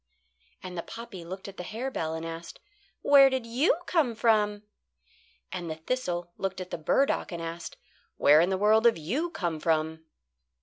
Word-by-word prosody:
And 185 -1 -7
the 170 - -2
poppy 225 -3 -9
looked 190 +4 -7
at 195 - -10
the 180 - -5
harebell 215 -6 -3
and 160 0 -5
asked: 165 +1 -7 0.4
"Where 275 -1 +8
did 260 -3 -2
you 250 +9 +2
come 300 -11 +1
from?" 210 -2 +2 0.9
And 175 -3 -5
the 160 - -3
thistle 175 -2 -3
looked 190 -1 -2
at 185 -1 -7
the - - -4
burdock 270 - +1
and 170 - -5
asked: 165 0 -6 0.4
"Where 150 +2 +6
in 175 - +2
the 190 - 0
world 215 +3 +4
have 235 -5 +5
you 245 - -2
come 175 - -3
from?" 160 0 0
190 Hz, 175 wpm, -28 LUFS, 165-230 Hz, 0.9 s, Where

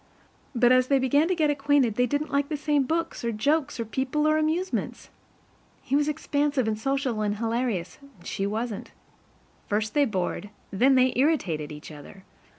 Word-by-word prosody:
But 240 +1 +4
as 255 0 +4
they 275 - +3
began 285 +4 +2
to 370 - +1
get 310 -3 +2
acquainted, 280 -4 +2
they 250 +3 +1
didn't 290 +4 -2
like 280 0 0
the 300 - -2
same 295 -2 +1
books 330 +1 -2
or 235 - 0
jokes 285 +6 0
or 230 - -2
people 270 +6 -1
or 310 - +3
amusements. 330 +5 -2 0.7
He 270 - -1
was 295 +1 +2
expansive 290 -4 0
and 220 - 0
social 270 -3 -1
and 205 -1 0
hilarious, 225 -5 -2 0.2
and 175 - -19
she 195 - -2
wasn't. 220 +1 -4 0.8
First 210 +1 -1
they 290 -1 +4
bored, 205 -2 -3 0.2
and 195 - -6
then 265 +1 +6
they 255 0 +4
irritated, 195 - 0
each 150 +1 -10
other. 150 +6 -12
260 Hz, 180 wpm, -26 LUFS, 215-290 Hz, 0.8 s, then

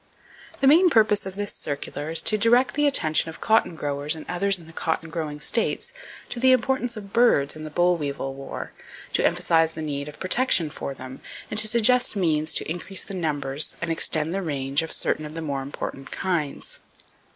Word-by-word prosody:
The 270 - +4
main 340 +6 +6
purpose 215 - +3
of 190 - -8
this 205 0 -4
circular 145 +1 -5
is 165 - +5
to 215 - +4
direct 240 +5 +4
the 295 0 +2
attention 160 - +2
of 160 - -10
cotton 220 -6 +2
growers 145 0 -3
and 155 - -9
others 195 +2 +2
in 170 - -14
the 165 - -15
cotton 160 0 -3
growing 155 -3 -4
states 440 - 0 0.4
to 240 - -2
the 260 +1 +5
importance 250 -1 0
of 200 -2 -10
birds 230 -13 +3
in 155 0 -8
the - - -6
boll 175 +3 +2
weevil 140 -3 -4
war, 135 0 -8 0.4
to - - +2
emphasize 165 -1 +2
the 160 - -7
need 140 -1 -4
of 150 - -13
protection 185 - +2
for 135 - -6
them, 130 0 -10 0.3
and 215 - +3
to 215 - +4
suggest 235 +2 +3
means 155 -5 +1
to - - +1
increase 175 +4 -2
the - - -9
numbers 150 -5 -1
and 165 0 -3
extend 160 0 0
the 195 - -2
range 140 -3 -1
of 160 - -6
certain 155 - 0
of 150 +1 -8
the - - -4
more 140 -4 -3
important 135 0 -7
kinds. 170 -7 -3
165 Hz, 200 wpm, -24 LUFS, 150-215 Hz, 0.4 s, main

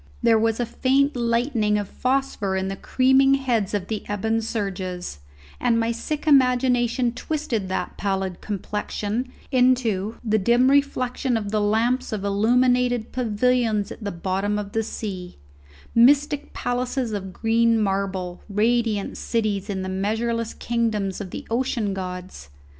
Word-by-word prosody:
There 230 -1 +5
was 225 +1 +1
a 240 - +1
faint 270 +4 +1
lightning 235 -2 +1
of 205 -1 -2
phosphor 255 -7 -1
in 190 0 -1
the 195 - -3
creaming 265 +5 +4
heads 235 -7 0
of 190 -2 -3
the 215 -2 -3
ebon 220 +2 0
surges, 185 - -4 0.4
and 235 -2 +2
my 230 0 +1
sick 290 +7 -4
imagination 250 -3 +3
twisted 245 -9 -3
that 185 -1 -3
pallid 190 -2 -2
complexion 210 +4 -3 0.2
into 245 -5 +2
the 220 -2 +2
dim 240 +6 +4
reflection 260 -3 +1
of 205 -2 -4
the 215 -1 +1
lamps 230 +5 +1
of 205 -2 -3
illuminated 245 +3 +2
pavilions 230 -2 +1
at - - -9
the 200 - -2
bottom 195 +4 -1
of 205 -1 -4
the 225 - 0
sea; 190 -5 -6 0.6
mystic 285 +4 +4
palaces 245 -1 -2
of 190 -2 -4
green 230 +2 +2
marble, 195 -3 -2
radiant 215 0 0
cities 215 -4 -1
in 190 -2 -2
the - - -4
measureless 225 +4 -1
kingdoms 215 -5 -1
of 195 - -6
the - - -7
ocean 235 -4 0
gods. 180 - -7
225 Hz, 140 wpm, -23 LUFS, 200-250 Hz, 0.6 s, There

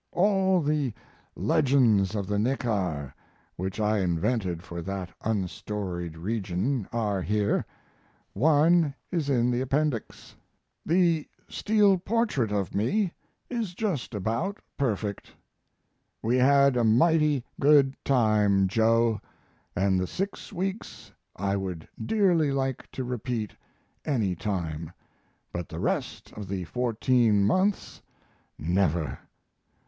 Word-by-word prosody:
All 190 -1 +3
the 145 -5 0 0.4
"legends 115 -8 +3
of 100 -2 -1
the 100 +1 -1
Neckar," 100 - -1 0.4
which 95 +3 -4
I 105 0 +2
invented 90 0 -1
for 85 -1 -6
that 95 0 -5
unstoried 95 -4 -3
region, 100 +4 -2
are 105 -5 -1
here; 105 +2 0 0.7
one 155 - +4 0.2
is 165 -6 -1
in 125 -2 +2
the 120 +1 0
Appendix. 135 -2 -2 0.5
The 170 -2 +2 0.2
steel 205 -3 +3
portrait 200 - 0
of 100 -3 -1
me 175 - 0 0.3
is 225 -8 -3
just 170 - -2
about 115 - -2 0.2
perfect. 105 -6 -2 0.9
We 120 +3 +2
had 140 +1 +5
a 120 - +2
mighty 145 +4 +3 0.2
good 140 -2 +5
time, 105 -6 +3
Joe, 115 +1 +2 0.5
and 95 0 +2
the 90 - -1
six 195 - -4
weeks 175 - -5 0.2
I 100 +1 -1
would 95 -5 -4 0.2
dearly 180 -9 +2
like 135 -2 -2
to 130 - -3
repeat 120 -3 -3 0.5
any 115 -11 0
time; 85 -4 -4 0.6
but 85 -1 -4
the - - -6
rest - - -2
of 105 -2 -7
the 95 -1 -3
fourteen 115 +2 +2
months 185 - 0 0.6
never. 85 -4 0
115 Hz, 110 wpm, -27 LUFS, 100-145 Hz, 0.9 s, had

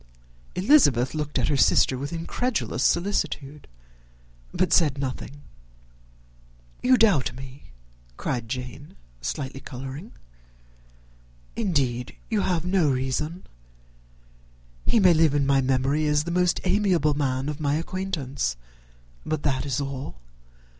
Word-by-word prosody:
Elizabeth 180 - +4
looked 150 -1 -3
at - - +1
her 145 - +2
sister 135 -1 +4
with 140 +3 -5
incredulous 210 +8 -2
solicitude, 155 -6 -1 0.8
but 185 - +1
said 150 -5 +4
nothing. 140 +1 -5 1.4
"You 255 0 +5
doubt 200 - +3
me," 130 +1 -11 0.5
cried 120 -4 -3
Jane, 125 +3 -6 0.3
slightly 135 - -4
colouring; 135 - -8 1.4
"indeed, 135 - -1 0.2
you 215 -2 +2
have 175 -3 0
no 180 -4 +2
reason. 135 +6 -2 1.4
He 230 - +4
may 185 -4 +6
live 160 -3 +3
in 140 -1 +2
my 135 0 +3
memory 135 +4 +1
as 150 0 +2
the 170 - -4
most 180 0 +2
amiable 185 -6 +2
man 135 -2 -1
of 150 0 -4
my 145 -1 +1
acquaintance 160 - -3 0.7
but 155 -1 -3
that 135 0 0
is 135 -1 -1
all. 135 - -5
145 Hz, 120 wpm, -25 LUFS, 135-175 Hz, 1.4 s, may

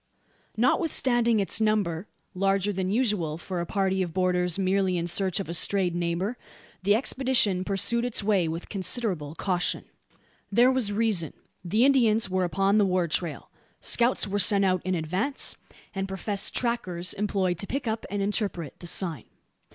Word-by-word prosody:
Notwithstanding 240 - +2
its 200 +2 +2
number 205 -4 0 0.3
larger 195 +1 +1
than 185 -1 -2
usual 205 -9 0
for 175 0 -4
a 170 - -5
party 190 -1 0
of 175 -3 -4
borderers 180 -1 +1
merely 190 -1 +1
in 170 - -2
search 185 +1 0
of 195 - -4
a 170 - -4
strayed 185 +1 +2
neighbour 175 +7 -2 0.4
the 200 +2 +3
expedition 240 -6 +1
pursued 205 +5 0
its 245 -4 +1
way 200 -5 +2
with, 165 +2 -5
considerable 190 - -1
caution. 180 -1 -1 0.7
There 240 +5 +5
was 255 -6 +1
reason. 205 -7 0 0.3
The 215 +8 +2
Indians 225 -7 +3
were 185 -1 +1
upon 195 +4 +2
the 205 - +4
war 180 -2 +1
trail. 160 0 -3 0.3
Scouts 240 -1 +2
were 200 +1 -1
sent 200 +1 +4
out 185 -2 +1
in 185 0 -1
advance; 185 - -1 0.4
and 195 0 -3
professed 195 +1 -2
"trackers" 185 -8 -2
employed 190 -4 -1
to 200 - -1
pick 270 -2 -3
up, 220 0 -3
and 200 0 -2
interpret 195 - -3
the 175 - -8
"sign." 170 - -1
195 Hz, 160 wpm, -26 LUFS, 180-215 Hz, 0.7 s, There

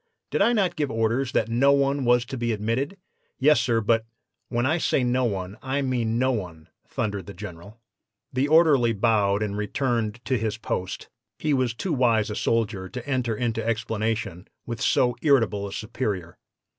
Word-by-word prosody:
"'Did - - 0
I 220 +4 +5
not 200 -6 +1
give 145 -3 -1
orders 115 +3 0
that - - +2
no 125 +5 +3
one 140 0 +1
was 120 0 +4
to 130 - -6
be 120 -1 -1
admitted?' 115 - -2 0.4
"'Yes, 145 -3 +4
sir; 115 -2 +1
but 115 +1 +2 0.2
' - - -54
"'When 120 0 0
I 160 +6 +2
say 135 - +1
no 125 +1 +1
one, 100 -1 -3
I 135 +1 -1
mean 120 -4 0
no 130 +2 +2
one,' 85 -8 -5 0.2
thundered 100 -5 -3
the 100 - -9
General. 100 +3 -10 0.5
"The 130 +3 +1
orderly 145 -7 +5
bowed 105 -2 +2
and 100 -1 -3
returned 115 +1 -1
to 130 -3 +1
his 110 0 -2
post. 95 -4 -4 0.3
He 155 -1 0
was 130 -3 +1
too 175 +8 -2
wise 115 -5 +2
a - - -4
soldier 105 -5 -1
to 125 +5 -7
enter 125 -5 0
into 115 -1 -1
explanation 110 -4 -2 0.2
with 115 -2 -5
so 125 -1 +2
irritable 115 -9 +2
a - - -8
superior. 100 -6 -4
115 Hz, 180 wpm, -25 LUFS, 105-130 Hz, 0.5 s, I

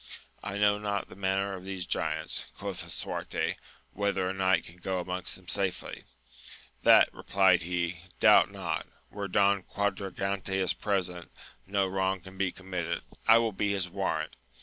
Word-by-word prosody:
I 100 0 -4
know 105 0 +4
not 100 -1 -2
the - - -11
manner 95 +1 0
of 95 -1 -7
these 95 -2 -4
giants, 80 -2 -1
quoth - - -4
Lisuarte, - - -3 0.4
whether 100 -2 0
a 95 - -1
knight 95 0 +2
can 85 - -13
go 95 +1 -2
amongst 90 0 -3
them 95 -1 -14
safely? 95 -1 -2 0.8
That, - - +7
replied 95 -3 +3
he^ 85 0 -1 0.2
doubt - - +7
not; - - -3 0.2
where 100 -1 -4
Don 100 0 +3
Quadragante 100 0 -2
is 95 -1 +2
present, 90 -4 -2 0.4
no 100 0 +1
wioiig 95 -1 0
can 95 0 -11
be 95 -1 0
committed: 90 -2 -4 0.2
I 115 - +9
will 115 -1 +2
be 100 +1 0
his 95 -2 -1
warrant. 80 -5 -2
95 Hz, 155 wpm, -30 LUFS, 90-100 Hz, 0.8 s, I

